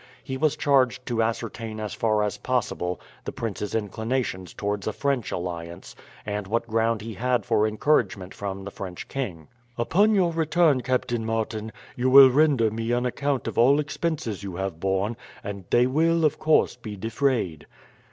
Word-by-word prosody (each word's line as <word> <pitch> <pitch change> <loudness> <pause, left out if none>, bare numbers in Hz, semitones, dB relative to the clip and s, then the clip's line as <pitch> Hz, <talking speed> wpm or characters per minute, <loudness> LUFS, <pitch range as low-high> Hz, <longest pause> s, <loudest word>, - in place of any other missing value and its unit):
He 130 - -4
was 150 +2 +1
charged 130 -6 +2
to 120 -2 0
ascertain 115 -1 -3
as 105 -1 -4
far 110 -2 +1
as 105 - -2
possible 105 -8 -1 0.2
the - - -4
prince's 105 -1 -4
inclinations 110 -3 -2
towards 100 -1 -3
a 110 - -1
French 140 -4 -1
alliance, 85 -1 -6 0.3
and 105 -1 -3
what 115 +3 0
ground 115 0 +1
he 115 0 -6
had 120 +1 0
for 105 +1 +2
encouragement 105 -6 0
from 95 -1 -5
the 100 - -7
French 90 -3 -7
king. 90 - -5 0.3
"Upon 200 - +3
your 180 -4 +3
return, 160 -3 +2
Captain 120 -2 -1
Martin, 110 -1 -2 0.2
you 125 +1 +1
will 135 0 +9
render 135 -6 +3
me 115 +1 -3
an 120 +1 +1
account 140 +2 -1
of - - -2
all 135 +5 +5
expenses 145 - -2
you 95 -3 -6
have 95 -3 -4
borne, 95 +5 0 0.3
and 100 -2 -6
they 120 +1 +4
will, 160 +5 +2
of 150 - +1
course, 155 -5 +3
be 110 -4 -8
defrayed." 115 - -1
115 Hz, 170 wpm, -25 LUFS, 100-130 Hz, 0.3 s, will